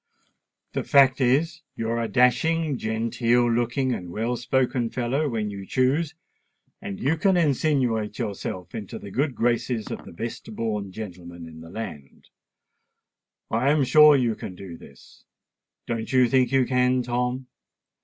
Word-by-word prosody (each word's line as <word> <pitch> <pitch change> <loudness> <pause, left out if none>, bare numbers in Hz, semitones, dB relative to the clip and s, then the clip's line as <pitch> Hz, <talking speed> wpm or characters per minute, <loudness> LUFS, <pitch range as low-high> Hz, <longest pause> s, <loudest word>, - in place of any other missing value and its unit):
The - - -1
fact 135 -1 +5
is, 150 +6 +2
you're 115 +1 -2
a 115 - -1
dashing, 145 +7 +2
genteel 115 +2 +1
looking, 120 +2 0
and 90 -5 -6
well 115 +7 -2
spoken 125 -1 0
fellow 130 +5 -1
when 110 -4 -2
you 100 -1 -7
choose; 140 - 0 0.7
and 100 - -6
you 145 +5 +1
can 185 +3 +2
insinuate 130 -9 +1
yourself 100 -4 -5
into 105 -3 -6
the 100 - -10
good 135 +4 0
graces 120 -1 -1
of - - -6
the - - -11
best 110 +3 -7
born 105 -4 -3
gentlemen 90 -4 -8
in 80 0 -12
the 80 - -11
land. 85 -9 -8 1.2
I 120 +5 +2
am 150 -1 +3
sure 150 +3 +7
you 120 -4 +2
can 95 -3 -8
do 90 -2 -9
this—don't 115 +6 -10
you 130 -2 +5
think 125 0 +2
you 135 -1 +3
can, 125 0 +2
Tom?" 125 +2 -2
120 Hz, 145 wpm, -25 LUFS, 110-130 Hz, 1.2 s, sure